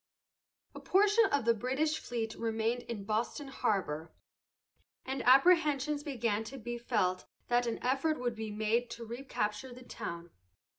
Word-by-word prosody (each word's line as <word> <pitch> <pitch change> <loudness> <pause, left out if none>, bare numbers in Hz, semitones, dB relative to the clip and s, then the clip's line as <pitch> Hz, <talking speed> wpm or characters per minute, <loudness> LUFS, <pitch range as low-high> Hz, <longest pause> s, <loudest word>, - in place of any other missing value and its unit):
A - - -8
portion 415 +3 +4
of 285 - 0
the 235 - +5
British 265 +7 0
fleet 225 -2 -3
remained 225 +1 -1
in 215 -4 -4
Boston 225 +7 -2
harbor, 165 - -1 0.9
and 265 +1 -3
apprehensions 295 0 +5
began 235 -7 -1
to 270 +4 -8
be 240 0 -5
felt 185 -6 0 0.2
that 240 0 +2
an 230 - -1
effort 275 +4 +1
would 245 -1 -1
be 220 0 -5
made 220 +3 0
to 235 0 -7
recapture 235 -1 -3
the 250 +1 -11
town. 170 -8 -6
240 Hz, 145 wpm, -32 LUFS, 220-270 Hz, 0.9 s, the